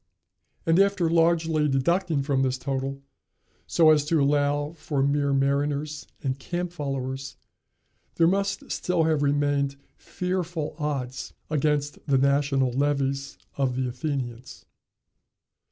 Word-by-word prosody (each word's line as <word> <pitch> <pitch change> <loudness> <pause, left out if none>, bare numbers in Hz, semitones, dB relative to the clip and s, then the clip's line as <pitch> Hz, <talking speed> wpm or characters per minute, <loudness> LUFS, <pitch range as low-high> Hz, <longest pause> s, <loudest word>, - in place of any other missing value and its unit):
And 165 +2 +4
after 195 -4 +3
largely 165 -2 +3
deducting 160 +3 +1
from 135 -1 +1
this 130 -1 +1
total, 135 +1 -3 0.6
so 160 -2 +5
as 150 -2 +4
to 160 +1 +2
allow 145 +1 +1
for 145 -4 -2
mere 140 0 +1
mariners 140 +2 0 0.2
and 135 -1 -2
camp 175 +2 -3
followers, 135 -3 -4 0.8
there 165 - +4
must 195 +3 0
still 180 -2 +1
have 155 -2 +2
remained 145 -1 +1 0.2
fearful 175 -4 -3
odds 135 -4 -3 0.2
against 150 -1 0
the 140 -2 +3
national 140 -1 +2
levies 140 0 -1 0.2
of 135 -3 0
the 130 0 -1
Athenians. 125 -2 -5
145 Hz, 120 wpm, -26 LUFS, 135-160 Hz, 0.8 s, so